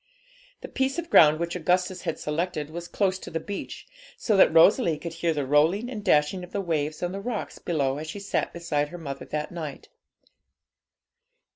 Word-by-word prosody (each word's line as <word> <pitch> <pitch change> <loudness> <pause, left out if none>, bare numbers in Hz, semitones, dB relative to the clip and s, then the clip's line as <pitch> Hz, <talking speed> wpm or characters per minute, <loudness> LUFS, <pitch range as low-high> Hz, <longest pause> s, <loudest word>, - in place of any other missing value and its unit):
The - - -7
piece 265 +2 -1
of 340 -1 -5
ground 155 0 +7
which 170 +1 -2
Augustus 180 +1 0
had 165 -4 -3
selected 155 -1 -3
was 170 +1 -6
close 190 -1 0
to - - -9
the 165 - -3
beach, 200 +4 -7 0.3
so 220 - +1
that 195 - +6
Rosalie 165 - +5
could 170 +1 -6
hear 165 0 0
the 145 -3 -2
rolling 160 - +2
and 215 -4 -6
dashing 180 0 +2
of 180 - -10
the 200 - -2
waves 155 -4 -2
on 175 - -1
the 195 +1 -5
rocks 230 0 -4
below 140 -4 -1
as 155 - -6
she 180 - -6
sat 200 - -2
beside 155 -4 -2
her 175 - -8
mother 140 -5 -7
that 150 0 -4
night. 155 -5 -7
170 Hz, 190 wpm, -26 LUFS, 150-190 Hz, 0.3 s, ground